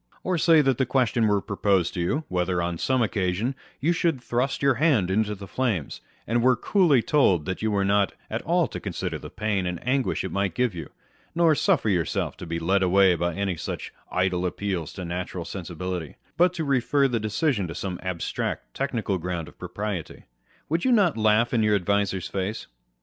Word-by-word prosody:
Or 180 -2 0
say 165 -1 +6
that 135 -3 +1
the 130 - +3
question 120 -3 +2
were 100 -1 +2
proposed 95 -4 +1
to 90 - -2
you 85 +10 +1
â€" 155 - -3
whether, 90 0 0
on 85 -1 -2
some 130 -2 +2
occasion, 100 +4 -1 0.3
you 165 +6 +2
should 165 -5 0
thrust 125 +3 -1
your 140 -1 +5
hand 120 - +3
into 105 +1 +1
the 100 0 -9
flames, 95 - -2 0.2
and 120 +2 +1
were 125 +1 +5
coolly 155 - +3
told 95 - +3
that 95 - -4
you 110 - +1
were 100 -2 +1
not 100 -1 +2
at - - -3
all - - +2
to - - -6
consider - - -4
the - - -9
pain 100 -4 -1
and 90 -1 -3
anguish 135 0 +1
it 95 - -4
might 100 -3 -1
give 125 -4 +1
you, 80 -4 -7 0.5
nor 170 -2 +5
suffer 160 - +2
yourself 90 -6 0
to 90 - -8
be 85 0 -2
led 95 +4 +1
away 95 0 +5
by 85 0 -1
any 100 -2 -1
such - - -6 0.2
idle 90 -1 +1
appeals 90 -3 -2
to 90 - -6
natural 90 0 -4
sensibility, 90 -3 -5 0.2
but 180 +1 +4
to 165 - -2
refer 140 0 +2
the 120 -3 -1
decision 110 - 0
to 80 - -7
some 90 -3 -4
abstract, 90 -2 -3
technical 115 -8 -1
ground 85 -2 -4
of - - -16
propriety, 100 -6 -4
â€" - - -19 0.4
would 165 +3 0
you 260 - +3
not 205 -8 +4
laugh 110 +2 +3
in 115 - +3
your 105 -1 +3
adviser's 100 -1 0
face 100 +3 -3
100 Hz, 205 wpm, -25 LUFS, 90-130 Hz, 0.5 s, say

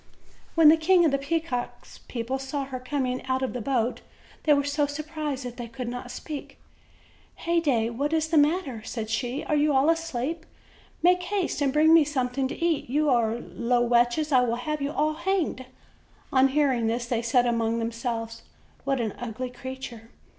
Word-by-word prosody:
When 325 -2 +8
the 320 - +7
King 345 +2 +4
of 310 - +3
the 275 - +1
Peacocks' 280 -4 -3
people 250 +2 -3
saw 270 +1 -3
her 260 -1 -6
com 265 +2 -2
ing 250 0 -3
out 260 0 0
of 260 - -2
the 250 - -4
boat, 245 0 0 0.4
they 300 - +6
were 285 - +1
so 285 +1 0
surprised 300 -2 -4
that 245 0 -7
they 240 -1 -5
could 245 +1 -6
not 245 +1 -5
speak. 285 +3 -7 0.8
"Heyday, 290 -10 +1
what 280 +6 -2
is 320 -1 +1
the 325 - +2
matter?" 290 -6 +1
said 225 -1 -5
she. 245 +5 -2
"Are 300 - 0
you 295 -1 +3
all 275 +5 +5
asleep? 325 -1 -3 0.6
Make 360 +1 +5
haste 360 -4 -2
and 275 -2 +2
bring 310 +3 +5
me 330 -1 +8
something 265 -2 -1
to 265 - -5
eat. 335 -7 0
You 295 +2 +2
are 230 -2 +2
low 240 0 0
wretches, 240 +6 +2
and 255 -2 +6
I 245 - 0
will 230 - 0
have 300 +5 -3
you 280 +1 -1
all 305 +1 +1
hanged." 340 -6 -1 0.7
On 265 0 +6
hearing 265 -5 +1
this, 235 +2 -1
they 235 -1 -1
said 245 +1 +2
among 230 -1 +1
themselves: 230 0 -3 0.4
"What 275 -1 0
an 220 -3 -1
ugly 245 +1 -5
creature! 250 -3 -8
265 Hz, 190 wpm, -26 LUFS, 240-305 Hz, 0.8 s, When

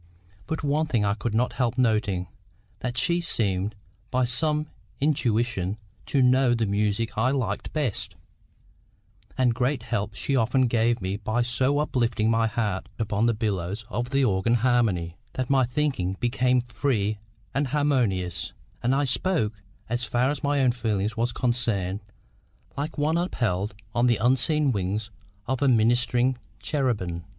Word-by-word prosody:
But 160 - -3
one 150 +2 +1
thing 115 -8 +1
I 100 - +2
could 110 0 -3
not 125 +3 +1
help 125 -1 0
noting—that 105 0 -2
she 175 -3 +2
seemed, 105 - 0 0.3
by 130 0 +1
some 150 +5 +1 0.3
intuition, 115 -8 0 0.3
to 135 -2 +2
know 125 -1 +4
the 115 -1 0
music 105 +2 0
I 120 +3 +3
liked 125 -7 -2
best; 105 -11 -2 1.2
and 125 -2 +3
great 125 +1 0
help 105 -2 -2
she 140 - -1
often 125 +2 +3
gave 115 -2 +1
me 95 +2 -1
by 110 +3 0
so 130 +4 +1
uplifting 120 -6 +1
my 115 0 +3
heart 105 -4 -2
upon 110 0 +1
the 115 - +2
billows 105 -1 -2
of 120 +3 -2
the 135 0 +2
organ 100 +2 +2
harmony, 110 -9 +1 0.2
that 130 0 -2
my 135 -2 +4
thinking 125 -9 -1
became 125 +1 +2
free 110 -3 -1 0.3
and 140 +2 +1
harmonious, 125 - 0 0.3
and 125 +2 +2
I 145 +1 +2
spoke, 125 - 0 0.3
as 120 +2 -2
far 125 +3 +1
as 145 - -4
my 145 -1 +2
own 130 -2 +4
feeling 110 -4 -1
was 120 +1 0
concerned, 115 -7 0 0.8
like 145 +3 -4
one 155 +3 +2
upheld 105 - -1 0.2
on 120 +1 +3
the 120 - +3
unseen 135 +4 +2
wings 105 +1 -2 0.3
of 130 +1 -2
ministering 120 0 +3 0.2
cherubim. 105 - -1
120 Hz, 145 wpm, -26 LUFS, 105-130 Hz, 1.2 s, know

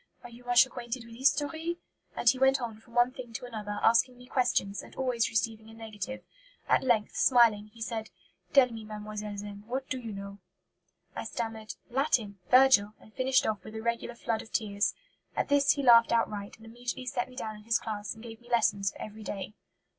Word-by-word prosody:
'Are 245 - -10
you 240 +1 -14
much 245 +1 +6
acquainted 240 -1 -6
with 230 - -12
history?' 295 +6 0 0.4
And - - -3
he 255 +2 +6
went 265 0 +4
on 230 -3 -5
from 235 +1 -19
one 240 +1 +4
thing 250 -3 -9
to 245 - -5
another, 210 -4 -5
asking 230 +2 +4
me 250 - -13
questions, 245 -6 0
and - - -14
always 250 -3 0
receiving 225 -1 -2
a 225 - -13
negative. 225 +3 -6 0.4
At - - +4
length, 235 -5 +1
smiling, 230 -5 +4
he 225 +2 -8
said: 225 -1 -4 0.4
'Tell 260 -3 +6
me, 225 -1 -7
mademoiselle, 210 -1 -6
then, 205 0 -7
what 260 +2 -3
you 260 - -5
do 230 -2 -6
know.' 200 0 -8 0.8
I - - -4
stammered 225 -2 -5 0.2
'Latin 235 -7 +1
Virgil,' 250 -5 +6
and 215 - -19
finished 260 0 +2
off 215 -2 -1
with 215 - -10
a 220 - -4
regular 235 +1 -2
flood 230 -1 -2
of - - -14
tears. 205 -2 0 0.4
At - - -1
this 285 0 +5
he 285 - -3
laughed 235 -2 +7
outright, 210 -3 -1
and 225 - -16
immediately 240 +2 -5
set 250 -1 -2
me 255 - -14
down 220 -3 -4
in 210 0 -14
his 230 0 +3
class 210 -1 -5
and 220 - -13
gave 225 -1 -10
me 240 - -18
lessons 205 -4 +2
for - - -15
every 215 +1 -8
day." 200 -1 -5
230 Hz, 205 wpm, -30 LUFS, 215-250 Hz, 0.8 s, laughed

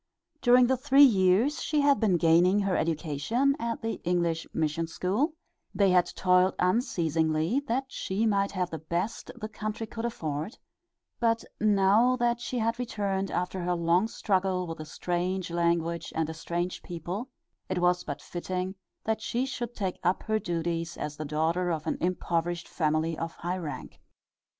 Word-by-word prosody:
During 250 0 +6
the 260 +1 +2
three 275 +2 +6
years 215 +4 +4
she 300 -1 +1
had 280 -1 +4
been 200 -6 +3
gaining 175 +5 +4
her 195 -2 0
education 165 - 0
at 230 -1 -3
the 225 - -3
English 170 -2 0
mission 160 +1 -1
school, 210 - -1 0.4
they 195 -2 +4
had 180 -1 +4
toiled 180 0 +3
unceasingly 165 - +1
that 260 +3 +1
she 215 -4 -2
might 200 -2 +2
have 180 -2 -1
the 160 - -4
best 175 - -3
the 225 -3 -5
country 215 +1 -4
could 225 +1 -6
afford, 160 - -4 0.6
but 230 -1 +2 0.2
now 210 +4 +4
that 240 -1 0
she 250 - -3
had 230 +1 0
returned 200 -5 -2
after 180 +1 -2
her 175 0 0
long 170 +4 +2
struggle 190 -4 0
with 165 -2 -6
a 155 - -6
strange 180 +3 -2
language 170 -1 0
and 160 0 0
a - - -6
strange 175 +2 -3
people, 175 - -5 0.4
it 185 - -1
was 180 0 +2
but - - -6
fitting 185 +1 -3 0.3
that 220 0 -1
she 245 +3 -1
should 245 -3 -5
take 190 -3 -3
up 180 +2 +1
her 220 -1 0
duties 170 -2 -2
as 150 - -4
the 155 - -4
daughter 160 +4 0
of 160 -3 -2
an - - -2
impoverished 175 -1 -1
family 155 0 0
of 165 0 -3
high 175 +2 -3
rank. 155 -4 -7
185 Hz, 165 wpm, -28 LUFS, 170-225 Hz, 0.6 s, During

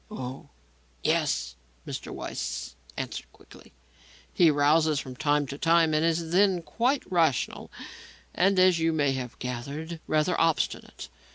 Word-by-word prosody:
"Oh, 130 -10 -7 0.5
yes," - - 0 0.3
Mr. - - -6
Weiss 60 +1 -5 0.2
answered - - -5
quickly; - - -17 0.6
"he 170 -3 +5
rouses 150 +1 +3
from 130 -2 -7
time 145 +1 +1
to 140 +2 -7
time 165 -1 +4
and 155 +1 +2
is 165 0 0
then 185 -1 +3
quite 240 - 0
rational, 165 -8 +1 0.6
and, 195 +1 +2
as 185 -2 +5
you 165 0 +1
may 145 -3 +2
have 130 -2 -5
gathered, 140 +7 -5
rather 155 +4 +1
obstinate. 165 -7 -1
160 Hz, 130 wpm, -27 LUFS, 140-170 Hz, 0.6 s, he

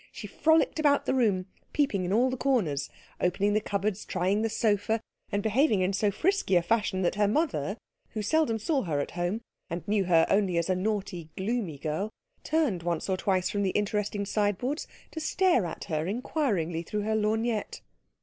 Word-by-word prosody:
She - - -8
frolicked 320 0 +2
about 290 -2 +3
the - - +1
room, 210 -8 +2 0.3
peeping 215 -11 +1
into 190 +4 +1
all 255 +2 +3
the - - -1
corners, 200 - 0 0.3
opening 195 +3 +1
the 215 - +2
cupboards, 200 0 -2
trying 190 +3 0
the 225 - +1
sofa, 215 0 +1 0.3
and 200 0 0
behaving 220 -2 +3
in 185 +2 +1
so 205 +2 +2
frisky 380 - +1
a 175 - +4
fashion 205 -1 +1
that 175 - +2
her 205 0 +2
mother, 210 - 0 0.4
who 215 - -2
seldom 300 -2 +2
saw 270 +6 0
her 155 - -1
at 145 - -3
home, 175 +5 -2 0.3
and 170 0 -5
knew 205 -2 +2
her 165 -2 +5
only 195 -3 +2
as 170 +2 +1
a - - +2
naughty 185 -4 -2
gloomy 195 -6 -2
girl, 155 +8 -2 0.3
turned 300 - +1
once 170 +2 -2
or 190 - +2
twice 185 -1 +1
from 205 -2 -1
the 195 - +1
interesting 210 0 -1
sideboards 210 - -1 0.2
to 320 - -5
stare 320 - +2
at - - -6
her 155 +1 -2
inquiringly 200 - -1
through 210 +5 -3
her 220 +1 0
lorgnette. 220 +1 -1
205 Hz, 190 wpm, -28 LUFS, 185-230 Hz, 0.4 s, her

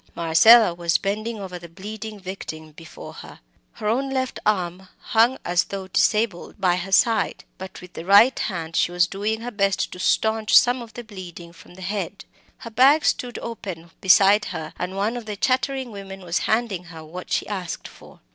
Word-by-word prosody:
Marcella 175 +6 +6
was 170 -1 +1
bending 215 +3 -3
over 185 -2 -7
the 170 0 -12
bleeding 210 +4 -8
victim 160 -5 -8
before 160 +1 -11
her. - - -12 0.3
Her 210 - -5
own 260 +5 0
left 260 -1 -2
arm 185 -2 -1
hung 235 +4 +2
as 175 0 +2
though 195 -1 -7
disabled 210 -1 0
by 180 -2 +2
her 185 +2 -5
side; 220 +2 +2 0.2
but 190 0 -9
with 180 0 -13
the - - -7
right 200 +8 +6
hand 165 -4 -4
she - - +2
was 175 -1 +3
doing 210 +5 -3
her 245 +1 -5
best 195 -2 0
to 180 - -9
staunch 220 +3 +3
some 245 +1 +4
of 230 -1 -11
the 240 - -7
bleeding 180 -5 -10
from 175 - -16
the 190 - -10
head. 195 0 -4 0.3
Her 230 - -10
bag 275 +7 +5
stood 245 -1 0
open 185 -8 -7
beside 195 +2 +5
her, 160 -3 -6
and 185 +2 -4
one 210 +4 0
of 240 -3 -7
the 210 - -4
chattering 260 +3 -1
women 195 -1 -9
was 175 -2 -1
handing 220 -6 0
her 165 -2 -11
what 180 +4 -9
she - - 0
asked 185 -5 -5
for. - - -17
195 Hz, 190 wpm, -23 LUFS, 175-225 Hz, 0.3 s, Marcella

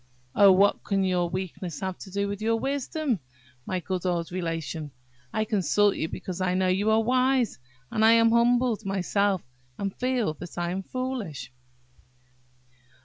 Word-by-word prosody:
"Oh, 200 -1 +7
what 200 +2 +4
can 195 -1 0
your 180 -2 +1
weakness 180 -2 -5
have 190 -1 -2
to - - -9
do 200 +1 -1
with 200 0 -5
your 225 +1 +2
wisdom, 275 - -1 0.5
my 185 - -1
good 180 +1 -3
old 175 -2 -1
Relation? 165 -3 -3 0.4
I 215 - 0
consult 205 -1 +2
you 160 - -2
because 185 +2 -6
I 180 -1 +1
know 185 0 +2
you 195 +4 +1
are 220 +1 +4
wise; 255 - +2 0.3
and 220 - +1
I 225 +1 +7
am 230 0 +5
humbled 235 -1 +3
myself, 195 0 0 0.3
and 195 -1 -3
feel 250 -9 0
that 175 -1 -9
I 175 0 -1
am 190 +2 -2
foolish." 205 - -5
195 Hz, 160 wpm, -26 LUFS, 180-230 Hz, 0.5 s, Oh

